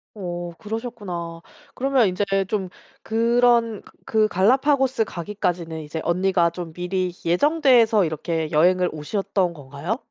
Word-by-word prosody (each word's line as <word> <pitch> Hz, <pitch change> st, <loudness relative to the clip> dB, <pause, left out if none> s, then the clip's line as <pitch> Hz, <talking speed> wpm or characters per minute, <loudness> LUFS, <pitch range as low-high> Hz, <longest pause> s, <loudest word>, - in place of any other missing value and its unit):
어 175 Hz, -3 st, -5 dB
그러셨구나. 205 Hz, -7 st, -6 dB, 0.3 s
그러면 265 Hz, -3 st, +2 dB
이제 185 Hz, +2 st, -1 dB, 0.3 s
좀 200 Hz, -3 st, -1 dB, 0.4 s
그런 230 Hz, -1 st, +2 dB
그 -, -, -19 dB, 0.3 s
그 215 Hz, 0 st, +5 dB
갈라파고스 260 Hz, +5 st, +2 dB
가기까지는 170 Hz, -4 st, -3 dB
이제 155 Hz, +1 st, -6 dB
언니가 180 Hz, -1 st, +2 dB
좀 170 Hz, -1 st, -8 dB
미리 180 Hz, +1 st, -2 dB
예정돼서 235 Hz, -, +4 dB
이렇게 160 Hz, 0 st, -2 dB
여행을 180 Hz, +3 st, +3 dB
오셨던 190 Hz, +3 st, -1 dB
건가요? 145 Hz, -, -5 dB
185 Hz, 295 characters per minute, -23 LUFS, 170-225 Hz, 0.4 s, 그